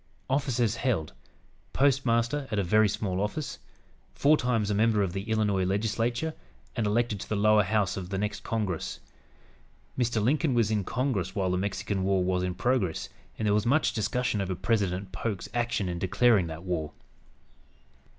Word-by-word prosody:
"Offices 125 -5 +1
held: 95 - -1 0.6
Postmaster 135 0 +2
at 105 - -2
a 100 - +2
very 105 +4 +4
small 95 -2 -2
office; 125 +8 -3 0.6
four 150 +2 +5
times 115 -6 0
a - - +2
member 110 0 +3
of 90 -3 -2
the 100 +3 -5
Illinois 105 -4 +1
Legislature, 115 +9 0 0.4
and 105 - 0
elected 110 0 +1
to - - -8
the 110 - 0
lower 105 +1 +5
House 100 -1 +1
of 90 -2 -5
the 95 - -2
next 105 +1 -3
Congress." 100 - -2 1.0
Mr. 120 -2 0
Lincoln 135 +5 +2
was 115 -2 +2
in 105 -2 +1
Congress 105 -5 -1
while 95 -3 0
the 90 - +1
Mexican 100 0 -2
War 95 -1 +2
was 90 0 0
in 90 -1 -2
progress, 120 -10 0 0.3
and 110 - -2
there 105 - +3
was 105 +2 +1
much 150 +6 +3
discussion 110 0 0
over 95 -1 -2
President 95 -2 -1
Polk's 100 0 -3
action 120 -4 0
in 85 -1 -3
declaring 100 +1 +3
that 80 +1 -7
war. 85 -5 -3
105 Hz, 170 wpm, -28 LUFS, 95-120 Hz, 1.0 s, four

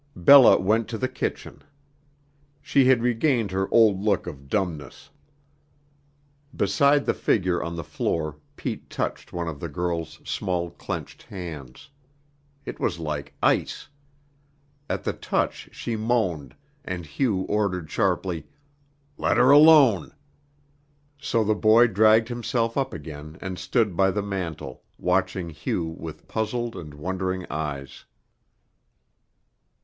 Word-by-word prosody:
Bella 130 +9 +8
went 110 +4 +1
to 115 - -4
the 130 - -1
kitchen. 130 - -5 1.0
She 140 -1 +2
had 125 -2 +4
regained 120 - +1
her 95 0 -2
old 110 -5 +4
look 105 -3 +1
of 70 -5 -9
dumbness. 80 - -3 1.4
Beside 140 +9 +3
the - - +2
figure 90 -4 0
on 85 0 -4
the 85 - -5
floor 75 -1 -3 0.2
Pete - - -5
touched - - -4
one 85 -1 -4
of 75 -3 -5
the 85 - -5
girl's 85 0 -3
small 85 -2 -2
clenched - - -7
hands. 85 - -9 0.7
It - - -7
was - - -1
like 75 -3 -5
ice. - - 0 1.0
At - - -2
the - - -1
touch - - -2
she 115 - -4
moaned, 110 - -1 0.3
and 90 -2 -5
Hugh 95 - -1
ordered 95 -5 -1
sharply: 90 -4 -1 0.7
"Let - - +1
her 125 +2 +6
alone." 145 - +6 1.0
So 125 -5 0
the 110 +1 +2
boy 110 +3 +5
dragged 110 +1 +4
himself 120 -1 -1
up 135 -1 -1
again 75 +1 -9
and 95 -1 -6
stood 95 +2 0
by 95 +2 +3
the 105 +1 -2
mantel, 95 -5 -5 0.2
watching 90 -1 -1
Hugh 80 +2 -3
with 80 -1 -8
puzzled 115 +1 -2
and 75 -3 -9
wondering 95 +3 -3
eyes. 70 -3 -5
95 Hz, 125 wpm, -25 LUFS, 85-115 Hz, 1.4 s, Bella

